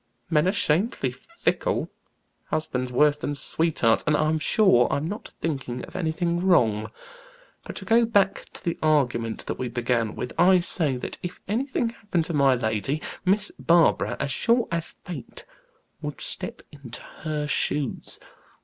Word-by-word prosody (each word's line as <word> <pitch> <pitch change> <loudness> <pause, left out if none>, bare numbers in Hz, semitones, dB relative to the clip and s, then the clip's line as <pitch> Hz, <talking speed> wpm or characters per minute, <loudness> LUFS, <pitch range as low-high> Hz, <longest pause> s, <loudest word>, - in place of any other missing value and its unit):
Men 155 +2 +3
are - - +4
shamefully 165 - +1
fickle, 335 - -2 0.5
husbands 130 -5 -2
worse 145 +3 +4
than 145 0 -3
sweethearts, 140 -4 +1
and 150 0 +4
I'm 155 +1 +1
sure 155 - +4
I'm 145 - 0
not 205 +5 -6
thinking 135 -6 -3
of - - -16
anything 170 0 0
wrong. 115 - +3 0.8
But - - -7
to - - -7
go 230 +1 +4
back 205 -4 +1
to - - -9
the 170 - -2
argument 125 -7 +1
that - - -4
we 130 - -2
began 120 -2 -1
with 125 - -5
I 185 +2 +7
say 160 -6 +2
that 125 - -6
if 180 - -6
anything 235 +2 0
happened 205 -8 -2
to 170 - -4
my 140 -3 +4
lady, 110 +4 -1 0.3
Miss 205 +3 +2
Barbara, 170 -1 +3
as 140 - -1
sure 235 - +2
as 170 -1 -1
fate, 165 -8 -8 0.6
would - - -5
step - - -6
into 140 -5 -9 0.2
her 155 -2 -2
shoes." 145 -2 -1
155 Hz, 155 wpm, -25 LUFS, 125-180 Hz, 0.8 s, I